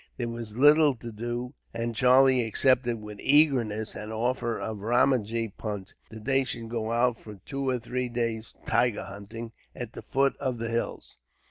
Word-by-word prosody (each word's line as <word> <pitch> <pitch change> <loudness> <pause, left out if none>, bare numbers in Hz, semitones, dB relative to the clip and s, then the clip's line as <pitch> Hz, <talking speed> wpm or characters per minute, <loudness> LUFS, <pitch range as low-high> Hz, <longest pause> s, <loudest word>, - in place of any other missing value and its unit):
There 120 -2 -2
was 115 -2 -7
little 145 +1 +6
to 115 0 -8
do, 120 +3 -4 0.2
and 115 0 -2
Charlie 130 0 +5
accepted 120 +1 +3
with 105 -1 -9
eagerness 130 -8 +3
an 105 +1 -7
offer 120 +1 -1
of 110 -2 -4
Ramajee 115 -1 +1
Punt, 105 -3 -5 0.2
that 110 -1 -11
they 135 0 +3
should 115 -3 -5
go 115 -1 -2
out 120 0 +2
for 105 -1 -10
two 135 -1 -2
or 130 - +1
three 125 +1 -3
days' 115 -2 -3
tiger 120 -3 +1
hunting, 105 +4 -8 0.2
at 120 -1 -6
the - - -8
foot 135 0 +1
of 130 -3 -2
the 115 0 -3
hills. 115 +1 -3
120 Hz, 170 wpm, -27 LUFS, 110-130 Hz, 0.2 s, little